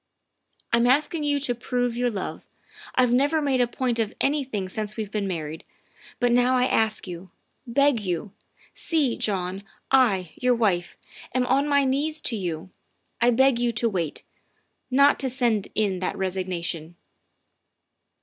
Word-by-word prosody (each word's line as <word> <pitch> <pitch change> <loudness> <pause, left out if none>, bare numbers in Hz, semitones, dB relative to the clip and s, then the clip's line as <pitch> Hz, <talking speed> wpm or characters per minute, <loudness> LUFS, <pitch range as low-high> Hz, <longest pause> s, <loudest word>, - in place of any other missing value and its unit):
' - - -23
I'm 235 +1 +4
asking 295 +4 +2
you 290 -1 +1
to 255 -3 0
prove 245 0 -2
your 245 0 +1
love. 200 -5 -5 0.5
I've 250 -2 +3
never 285 +5 +3
made 275 -4 +1
a 245 - +3
point 245 -1 -2
of 220 -1 -1
anything 265 -9 -1
since 210 +2 -4
we've 215 -2 -4
been 210 -2 -1
married, 160 -3 -5 0.6
but 245 0 +2
now 245 +1 +4
I 250 - +3
ask 220 -4 +1
you, 180 +1 -8 0.4
beg 275 +1 +3
you, 185 0 -3 0.4
see, 300 -8 +1
John, 190 -2 -2 0.3
I, 205 -11 +3
your 250 -1 +1
wife, 195 -7 0 0.4
am 255 -1 +2
on 275 +3 +2
my 285 -1 +4
knees 295 +4 0
to 235 - -1
you, 180 -2 -4 0.5
I 240 - +5
beg 260 +1 +4
you 240 0 +1
to 230 +1 +1
wait 175 -8 -3 0.7
not 280 +2 +4
to 265 - -1
send 240 -5 +1
in 200 -4 +1
that 185 - -3
resignation." 180 -3 -3
235 Hz, 160 wpm, -25 LUFS, 190-260 Hz, 0.7 s, I